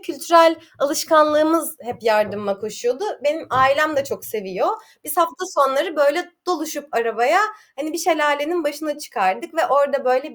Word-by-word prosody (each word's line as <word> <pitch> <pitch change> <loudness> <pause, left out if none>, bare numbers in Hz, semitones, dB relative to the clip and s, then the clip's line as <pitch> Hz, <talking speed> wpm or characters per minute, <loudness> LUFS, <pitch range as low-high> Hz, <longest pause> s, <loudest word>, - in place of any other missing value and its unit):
kültürel 330 -1 +4 0.2
alışkanlığımız 310 +1 +3
hep 245 -1 -10
yardıma 210 -2 0
koşuyordu. 395 - -4 0.2
Benim 300 +2 -1
ailem 275 +4 +3
de 275 - +1
çok - - -8
seviyor. 215 - -3 0.4
Biz - - -4
hafta 335 +1 0
sonları 295 0 0
böyle 300 +5 +1 0.2
doluşup 315 -4 -4
arabaya, 230 - +2 0.4
hani, 295 +3 -6
bir 340 - -5
şelalenin 320 0 0
başına 295 0 -4
çıkardık 300 - -3
ve 325 - +1
orada 280 0 +1
böyle 260 +3 0
295 Hz, 140 wpm, -20 LUFS, 265-325 Hz, 0.4 s, kültürel